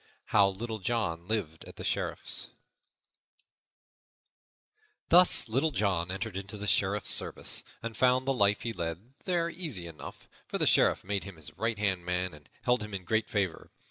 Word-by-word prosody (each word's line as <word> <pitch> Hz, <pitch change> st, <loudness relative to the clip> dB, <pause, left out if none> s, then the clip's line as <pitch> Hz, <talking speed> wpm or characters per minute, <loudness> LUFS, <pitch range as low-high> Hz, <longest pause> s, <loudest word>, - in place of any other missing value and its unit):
How 100 Hz, -2 st, +6 dB
Little 110 Hz, +3 st, -5 dB
John 90 Hz, -6 st, -2 dB
Lived 95 Hz, -8 st, -2 dB
at -, -, -12 dB
the -, -, -8 dB
Sheriff's -, -, -2 dB, 2.6 s
THUS 175 Hz, -5 st, +7 dB
LITTLE 130 Hz, +8 st, +1 dB
JOHN 100 Hz, -, 0 dB
entered 95 Hz, +2 st, -4 dB
into 100 Hz, +2 st, -6 dB
the 105 Hz, -, -5 dB
Sheriff's 100 Hz, 0 st, +1 dB
service -, -, +1 dB, 0.2 s
and 115 Hz, -1 st, -4 dB
found 130 Hz, 0 st, +3 dB
the 135 Hz, -, +3 dB
life 105 Hz, -4 st, +2 dB
he 115 Hz, -, -3 dB
led 85 Hz, +7 st, -5 dB
there 175 Hz, -2 st, +1 dB
easy 150 Hz, -, -3 dB
enough, 85 Hz, -2 st, -10 dB, 0.2 s
for -, -, -2 dB
the -, -, +2 dB
Sheriff -, -, +4 dB
made 100 Hz, 0 st, -1 dB
him 100 Hz, -2 st, -9 dB
his 80 Hz, -3 st, -11 dB
right 115 Hz, -1 st, 0 dB
hand 95 Hz, -4 st, 0 dB
man 90 Hz, 0 st, -1 dB
and 75 Hz, -1 st, -15 dB
held 125 Hz, -1 st, +2 dB
him 105 Hz, -1 st, -5 dB
in 95 Hz, -, -5 dB
great 110 Hz, +3 st, 0 dB
favor. 95 Hz, -5 st, -2 dB
105 Hz, 170 wpm, -30 LUFS, 90-115 Hz, 2.6 s, THUS